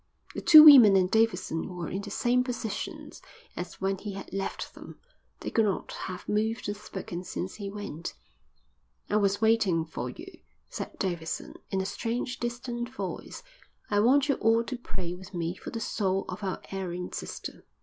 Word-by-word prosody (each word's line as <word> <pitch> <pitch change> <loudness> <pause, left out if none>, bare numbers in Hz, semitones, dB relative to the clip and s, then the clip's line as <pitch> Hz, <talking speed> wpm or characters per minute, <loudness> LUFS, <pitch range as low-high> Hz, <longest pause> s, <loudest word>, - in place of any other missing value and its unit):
The - - -4
two 310 -2 +11
women 255 -10 +10
and 185 -1 +3
Davidson 190 -6 +1
were 175 -1 -4
in 195 - -3
the 205 - -7
same 245 +4 +2
positions 240 -4 -5 0.3
as 175 0 -6
when 195 0 -1
he 205 -1 -5
had 195 -1 -8
left 195 0 -4
them. - - -11 0.4
They - - -4
could 225 - +3
not 200 - -2
have 185 -1 -6
moved 220 +2 0
or 205 - -1
spoken 190 -3 -7
since 185 +1 -4
he 200 -2 -6
went. 195 -5 -6 1.0
"I 210 - +4
was 200 0 +1
waiting 215 -7 +3
for 160 - -5
you," 355 +4 -11 0.3
said - - -6
Davidson, 170 -4 -3 0.2
in 190 - 0
a - - -3
strange, 235 +5 -3
distant 240 0 -3
voice. 265 - -6 0.5
"I 205 - +3
want 265 +6 +4
you 280 - +2
all 225 +1 +3
to 255 - -4
pray 185 -7 -5
with 185 +1 -10
me 170 0 -1
for - - -8
the 230 - -4
soul 195 -3 -1
of 180 +3 -6
our 190 -2 -3
erring 180 -2 -4
sister." - - -6
205 Hz, 180 wpm, -28 LUFS, 185-230 Hz, 1.0 s, two